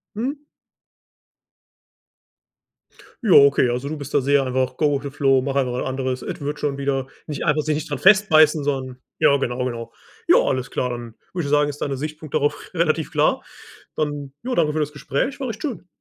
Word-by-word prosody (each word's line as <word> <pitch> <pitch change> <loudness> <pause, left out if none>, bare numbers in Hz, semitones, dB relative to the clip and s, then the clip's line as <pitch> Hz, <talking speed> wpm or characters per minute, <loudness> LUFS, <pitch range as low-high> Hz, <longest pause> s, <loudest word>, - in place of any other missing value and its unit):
Mhm. 275 +6 -3 2.8
Ja 215 - +1
okay, 140 -2 +6
also, 125 +3 -2
du 155 - -4
bist 145 -1 -8
da 145 - +5
sehr 140 +1 +3
einfach 130 0 -1
„go 150 -2 +2
with 140 - -6
the 140 - -4
flow”, 135 -1 +2
mach 135 0 -3
einfach 130 -3 0
was 125 - -2
anderes, 130 -1 -2
es - - -6
wird 145 +1 -4
schon 140 -2 -1
wieder, 135 -1 -1 0.2
nicht 150 - -4
einfach 150 0 +2
sich 155 -1 0
nicht 150 - -5
daran - - -4
festbeißen, 160 -7 +5
sondern 130 -3 -3 0.2
ja 140 - +5
genau, 125 -2 -2
genau. 120 -2 -5 0.3
Ja, - - +6
alles 130 -1 -1
klar, 125 - -1
dann 120 -2 -6 0.2
würde 175 -3 -2
ich - - -4
sagen, 145 0 +3
ist 145 - -9
deine 140 -2 -1
Sichtpunkt 155 +1 -7
darauf 145 - +1 0.2
relativ 160 -2 0
klar. - - +2 0.5
Dann, 145 -2 -3
ja, 250 +1 -3
danke 155 -3 +2
für 155 - -1
das 150 -1 -1
Gespräch. 150 - -2
War 265 -3 -3
echt 220 0 -7
schön. 250 - -4
145 Hz, 200 wpm, -22 LUFS, 130-155 Hz, 2.8 s, okay